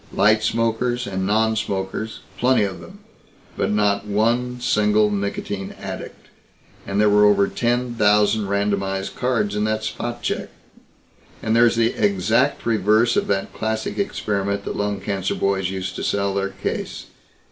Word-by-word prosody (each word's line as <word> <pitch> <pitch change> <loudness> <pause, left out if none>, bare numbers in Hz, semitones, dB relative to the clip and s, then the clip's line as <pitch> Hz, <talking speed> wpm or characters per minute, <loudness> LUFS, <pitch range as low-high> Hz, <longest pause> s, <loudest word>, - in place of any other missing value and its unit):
Light 110 +1 +3
smokers 115 +2 0
and 95 -1 -2
nonsmokers 110 -1 -1 0.2
plenty 125 -2 +3
of 95 -2 -3
them - - -13 0.5
but - - 0
not 105 -1 +1
one 120 +4 0
single 105 -2 +2
nicotine 100 -1 -3
addict. - - -7 0.6
And 100 +1 -1
there 105 - +5
were 105 0 +5
over 100 -1 +4
ten 120 0 -1
thousand 105 -1 +3
randomized 100 -1 -1
cards 110 -5 0
in 105 - 0
that 110 0 -1
spot 120 +2 -4
check. - - -2 0.9
And 110 0 +1
there's 120 0 +5
the 115 0 +2
exact 105 +7 +1
reverse 110 +1 +3
of - - +1
that 95 -1 -1
classic 110 - -3
experiment 100 - -2
the - - -3
lung 105 0 -2
cancer 95 -2 -2
boys 95 -1 0
used 95 -1 -4
to - - -4
sell 100 -1 0
their 100 0 -1
case. - - -5
105 Hz, 145 wpm, -22 LUFS, 100-115 Hz, 0.9 s, there